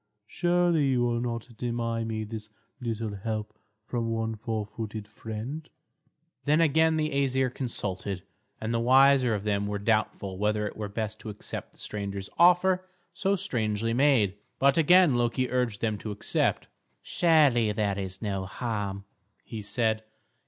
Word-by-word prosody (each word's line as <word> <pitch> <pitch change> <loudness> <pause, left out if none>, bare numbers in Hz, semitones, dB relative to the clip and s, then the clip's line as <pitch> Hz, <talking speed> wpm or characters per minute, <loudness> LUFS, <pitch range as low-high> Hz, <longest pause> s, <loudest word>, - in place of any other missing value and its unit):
Surely, 175 +2 +2
you 125 -2 +2
will 120 -1 0
not 120 0 -4
deny 115 -1 -2
me 110 -1 -3
this 110 0 -7 0.3
little 115 -3 -3
help, 110 +1 -4 0.3
from 115 -1 -2
one 115 0 -1
four 110 -1 -3
footed 110 0 -6
friend." 110 +9 -6 0.8
Then 150 +2 +4
again 160 0 +4
the 155 0 0
Æsir 130 -2 +1
consulted, 100 -7 -3 0.4
and 110 +1 -2
the 115 - +1
wiser 130 0 +5
of 100 - -4
them 100 -1 0
were 105 0 -2
doubtful 100 -3 0
whether 105 0 +1
it 105 - -5
were 105 -1 -4
best 110 +1 -4
to 110 - -7
accept 105 - -7
the - - -23
stranger's 100 -2 -5
offer 180 +2 +5 0.3
so 200 0 +1
strangely 115 - -1
made. 120 -7 +3 0.2
But 140 +1 +4
again 175 -1 +6
Loki 120 +1 0
urged 125 -5 0
them 110 -3 0
to 110 - -6
accept. 105 0 0 0.4
"Surely, 145 -10 +4
there 105 -2 0
is 95 +1 -5
no 95 -3 -2
harm," 100 -3 -3 0.4
he 110 -3 -7
said. 110 +1 0
115 Hz, 150 wpm, -28 LUFS, 105-130 Hz, 0.8 s, again